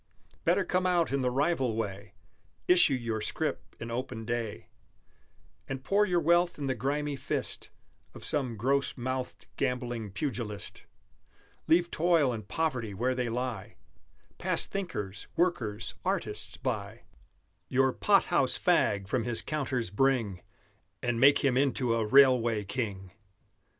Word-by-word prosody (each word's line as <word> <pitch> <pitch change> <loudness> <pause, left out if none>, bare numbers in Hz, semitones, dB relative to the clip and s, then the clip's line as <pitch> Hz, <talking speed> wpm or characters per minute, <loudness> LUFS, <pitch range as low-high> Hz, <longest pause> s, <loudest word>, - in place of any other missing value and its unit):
Better 185 +3 +3
come 185 +1 +1
out 175 -4 +2
in 140 0 +1
the 125 - +1
rival 135 -3 +1
way, 100 -2 -5 0.5
Issue 180 -6 +5
your 115 -3 -3
scrip - - -3
in 115 0 -6
open 120 -2 -4
day, 115 -2 -3 1.0
And 135 0 -4
pour 205 +5 +3
your 175 -1 +2
wealth 170 +2 +3
in 145 - -4
the 135 - +1
grimy 140 +4 -1
fist - - -3 0.5
Of - - -8
some 125 -5 0
gross 135 +6 +1
mouthed, 130 +1 -4
gambling 120 -4 -2
pugilist; 105 -3 -5 0.8
Leave 170 +1 +3
toil 160 -6 +3
and 110 -3 -7
poverty 120 -5 -2
where 125 +6 0
they 125 -2 -1
lie, 125 0 -4 0.6
Pass - - +2
thinkers, 135 - -5
workers, 125 - 0
artists, - - -2
by, - - -4 0.7
Your 130 0 +3
pot - - +4
house - - +3
fag 100 -1 +2
from 120 +3 0
his 120 -2 0
counters 130 -9 -2
bring 115 -6 +1 0.6
And 120 -2 0
make 140 +3 +5
him 130 -2 +3
into 130 -3 +2
a 115 -1 +1
Railway 120 -4 +5
King! 100 -4 -4
130 Hz, 135 wpm, -29 LUFS, 115-145 Hz, 1.0 s, Issue